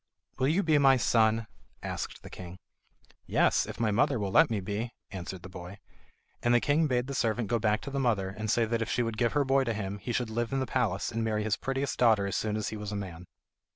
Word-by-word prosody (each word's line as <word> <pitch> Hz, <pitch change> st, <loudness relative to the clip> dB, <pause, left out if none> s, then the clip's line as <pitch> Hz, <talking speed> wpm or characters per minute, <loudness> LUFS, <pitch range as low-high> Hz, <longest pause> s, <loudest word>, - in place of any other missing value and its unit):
"Will 130 Hz, -, +2 dB
you 170 Hz, +7 st, +2 dB
be 155 Hz, -3 st, +4 dB
my 135 Hz, -1 st, +6 dB
son?" 115 Hz, -2 st, +3 dB, 0.4 s
asked -, -, -5 dB
the -, -, -9 dB
king. 90 Hz, 0 st, -9 dB, 0.7 s
"Yes, -, -, +2 dB
if -, -, -7 dB
my 115 Hz, -2 st, +2 dB
mother 125 Hz, +5 st, +2 dB
will 100 Hz, -3 st, -2 dB
let 160 Hz, +5 st, +6 dB
me," 105 Hz, +2 st, -2 dB, 0.2 s
answered 95 Hz, -1 st, -6 dB
the -, -, -7 dB
boy. 90 Hz, +1 st, -9 dB, 0.6 s
And 120 Hz, 0 st, +3 dB
the -, -, +6 dB
king 150 Hz, +5 st, +2 dB
bade 125 Hz, -2 st, +1 dB
the 140 Hz, -, -5 dB
servant 115 Hz, -3 st, 0 dB
go 120 Hz, 0 st, +1 dB
back 105 Hz, 0 st, +1 dB
to 140 Hz, -, -7 dB
the 140 Hz, -, -2 dB
mother 110 Hz, -7 st, +1 dB
and 105 Hz, +3 st, -5 dB
say 115 Hz, +2 st, +3 dB
that 115 Hz, +1 st, -1 dB
if 115 Hz, -, -2 dB
she 120 Hz, -, +1 dB
would 115 Hz, -1 st, -3 dB
give 120 Hz, -1 st, +2 dB
her 145 Hz, -1 st, +2 dB
boy 135 Hz, 0 st, +3 dB
to 115 Hz, -3 st, -2 dB
him, 100 Hz, -1 st, -4 dB
he 100 Hz, +5 st, -4 dB
should 120 Hz, -1 st, -1 dB
live 120 Hz, +1 st, -2 dB
in 135 Hz, -, +1 dB
the 130 Hz, -, 0 dB
palace 115 Hz, -6 st, -1 dB
and 115 Hz, 0 st, -2 dB
marry 110 Hz, -1 st, 0 dB
his 110 Hz, -1 st, +1 dB
prettiest 135 Hz, +1 st, -3 dB
daughter 110 Hz, -5 st, +4 dB
as 100 Hz, -, -2 dB
soon 110 Hz, -1 st, -1 dB
as 110 Hz, -, -2 dB
he 110 Hz, -, -6 dB
was 105 Hz, 0 st, -5 dB
a -, -, -3 dB
man. 90 Hz, -4 st, -6 dB
115 Hz, 255 wpm, -29 LUFS, 100-125 Hz, 0.7 s, my